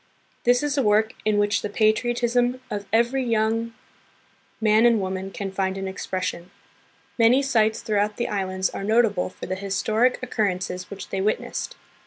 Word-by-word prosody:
This 245 +2 +4
is 290 -1 0
a - - +4
work 215 -1 +2
in 215 -1 +2
which 205 +1 +2
the 210 - -3
patriotism 240 +3 +1
of 205 -1 -4
every 235 +4 +2
young 220 -2 +1
24 225 +1 -2
THE - - -12
PHILIPPINES. 230 0 -32
man 220 +1 +4
and 230 -2 +3
woman 190 0 -3
can 195 0 -5
find 190 0 -1
an 195 0 -4
expression. 185 -2 -4 0.7
Many 240 +4 +5
sites 220 -5 +1
throughout 210 -1 0
the 240 - -1
islands 190 -2 -1
are - - -5
notable 215 -3 +2
for - - -9
the 185 - -3
historic 215 +5 +1
occur 225 -4 0
rences 180 -1 -4
which 200 -1 -8
they 190 - -2
witnessed. 210 +2 -2
215 Hz, 180 wpm, -24 LUFS, 195-235 Hz, 0.7 s, Many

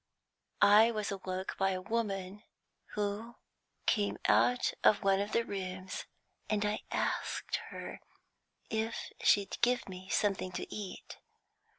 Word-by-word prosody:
I 210 +3 +8
was 215 -3 -2
awoke 190 -1 -4
by 195 0 +3
a 185 - -2
woman 195 -1 -2 0.5
who 210 +3 -2 0.5
came 205 -3 +2
out 245 0 +4
of 210 - +5
one 195 0 +4
of 205 - -3
the 230 - +2
rooms, 185 -2 -5 0.4
and 210 -1 +1
I 210 +1 0
asked - - -1
her - - -7 0.7
if 220 +1 -2
she'd 200 -1 +3
give 245 +1 +2
me 185 0 -9
something 195 -3 +1
to - - -3
eat. 205 -3 -7
205 Hz, 125 wpm, -33 LUFS, 190-215 Hz, 0.7 s, I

